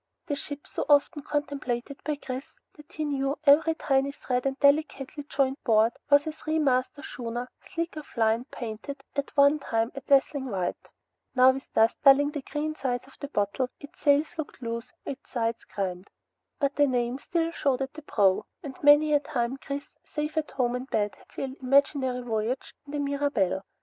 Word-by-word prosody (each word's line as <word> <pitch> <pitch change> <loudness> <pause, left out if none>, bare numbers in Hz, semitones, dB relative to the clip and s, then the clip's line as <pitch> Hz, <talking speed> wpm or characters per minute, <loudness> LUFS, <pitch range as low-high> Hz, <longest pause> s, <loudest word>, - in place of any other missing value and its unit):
The 295 -4 -1
ship, 285 0 -7
so - - -3
often 290 +1 +4
contemplated 280 -3 -3
by 300 +1 -1
Chris 265 -1 -6 0.3
that 300 +2 -16
he 310 -2 -3
knew 275 -1 -1
every 315 +2 +5
tiny 275 -2 +1
thread 255 -2 -2
and 270 0 -3
delicately 285 0 +2
jointed 270 0 0
board, 225 0 +4 0.2
was 285 0 +6
a 315 - -2
three 310 0 -2
masted 275 0 +1
schooner, 240 +1 -5
sleek 335 0 -4
of 305 - -7
line, 225 +2 +2
painted 255 +3 -7
at 280 +1 -3
one 285 +2 +6
time 230 -4 -1
a 275 - -6
dazzling 275 0 +2
white. 185 -4 -3 0.5
Now 255 0 +7
with 270 +1 -8
dust 225 +1 +4
dulling 285 +1 +7
the 295 -2 -4
green 300 +3 -3
sides 255 -5 -2
of 270 - -18
the 285 - -5
bottle, 210 +1 -1
its 300 +6 -13
sails 295 +3 +3
looked 305 - -5
loose, 230 -2 -5
its 275 -1 -7
sides 230 -2 -1
grimed. 190 -1 -4 0.5
But 280 0 0
the 290 -1 +5
name 245 0 0
still 330 +1 -1
showed 275 -5 0
at 265 - -6
the 310 - -9
prow, 200 -9 +2 0.2
and 270 -2 -6
many 295 +1 +6
a 290 - +6
time 255 -2 -2
Chris, 280 +1 -5 0.2
safe 300 0 -4
at 315 -1 -1
home 245 -2 0
in 250 +1 -4
bed, 210 -5 0
had - - -22
sailed 265 0 -5
imaginary 260 -1 +2
voyages 230 +2 -2
in 285 - -9
the 295 - -1
Mirabelle. 280 -10 0
275 Hz, 185 wpm, -27 LUFS, 245-290 Hz, 0.5 s, Now